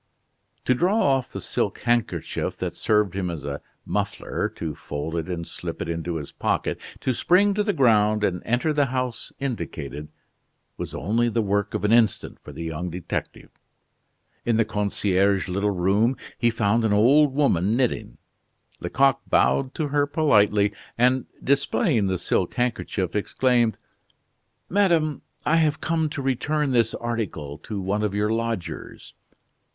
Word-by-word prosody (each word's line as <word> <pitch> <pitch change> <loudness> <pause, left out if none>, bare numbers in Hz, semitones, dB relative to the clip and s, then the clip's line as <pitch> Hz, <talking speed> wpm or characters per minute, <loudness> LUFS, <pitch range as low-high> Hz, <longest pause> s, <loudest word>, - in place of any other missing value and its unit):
To 130 - +4
draw 180 - +2
off 135 - +2
the - - -5
silk - - -2
handkerchief 120 -2 -1
that - - -4
served 105 -4 +2
him 95 -2 -2
as 80 -4 -5
a 70 0 -4 0.2
muffler, - - -2
to 80 -2 -4
fold 75 +3 -5
it 85 +2 -3
and 85 -2 -4
slip - - -6
it - - -3
into 85 +1 -3
his 75 -3 -5
pocket, - - -1 0.2
to 130 - +1
spring 195 - +3
to 210 - +1
the 205 0 +1
ground 110 - +3
and 90 -3 0
enter 125 +7 +1
the 145 -2 +2
house 125 -2 -3
indicated, 75 - -4 0.7
was - - -6
only 115 +5 +1
the 115 0 0
work 100 0 0
of - - -2
an 105 - +2
instant 115 -2 +2
for - - -11
the - - -7
young 80 +2 -4
detective. 85 0 -5 0.9
In 115 -2 +1
the 115 - +3
concierge's 100 -2 +1
little 100 +3 0
room 100 +7 +2 0.2
he 120 0 +2
found 115 0 +1
an 110 -2 +2
old 135 +7 +5
woman 110 - +2
knitting. 125 - -1 0.6
Lecoq 135 0 +2
bowed 135 -1 +2
to 155 -3 -1
her 145 0 +2
politely, 105 -9 +3 0.2
and, 125 +1 +3 0.2
displaying 140 - +2
the 95 -1 0
silk - - -1
handkerchief, 110 -7 -1
exclaimed: 120 +2 +2 0.9
"Madame, 170 -6 +2 0.2
I 165 - +3
have 155 -2 +2
come 160 -1 0
to 140 -2 -5
return 145 +2 0
this 115 -2 +2
article 105 -12 -4
to 105 -2 -5
one 100 +3 -1
of 105 -2 -1
your 105 +1 +1
lodgers." 115 -5 -4
115 Hz, 155 wpm, -24 LUFS, 95-135 Hz, 0.9 s, old